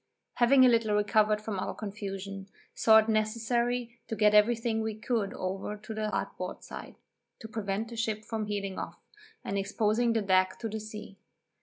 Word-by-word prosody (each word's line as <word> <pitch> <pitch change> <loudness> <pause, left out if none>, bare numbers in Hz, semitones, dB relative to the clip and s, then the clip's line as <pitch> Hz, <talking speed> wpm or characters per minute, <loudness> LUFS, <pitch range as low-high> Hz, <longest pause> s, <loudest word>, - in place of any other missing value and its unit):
Having 255 +2 +6
a - - +8
little 230 -3 +3
recovered 210 0 +3
from 215 -2 -4
our - - -3
confusion, 195 -2 -6 0.3
saw 220 -1 +6
it 220 0 +4
necessary 235 +2 0
to 225 - -3
get 210 0 +4
every 210 +3 +6
thing 225 -1 -1
we 220 -1 -2
could 215 -2 -1
over 190 +3 -4
to 215 +1 -8
the 215 0 -2
larboard - - -4
side, - - -9 0.4
to 220 - -9
prevent 215 0 -3
the 235 - -8
ship 220 -1 -2
from 220 -2 -3
heeling 200 -2 -3
off, - - -6 0.5
and 200 0 -1
exposing 215 +4 +1
the 225 -2 +1
deck 185 -1 +3
to 230 - -4
the 220 0 -4
sea. 210 -2 -9
215 Hz, 180 wpm, -29 LUFS, 205-225 Hz, 0.5 s, a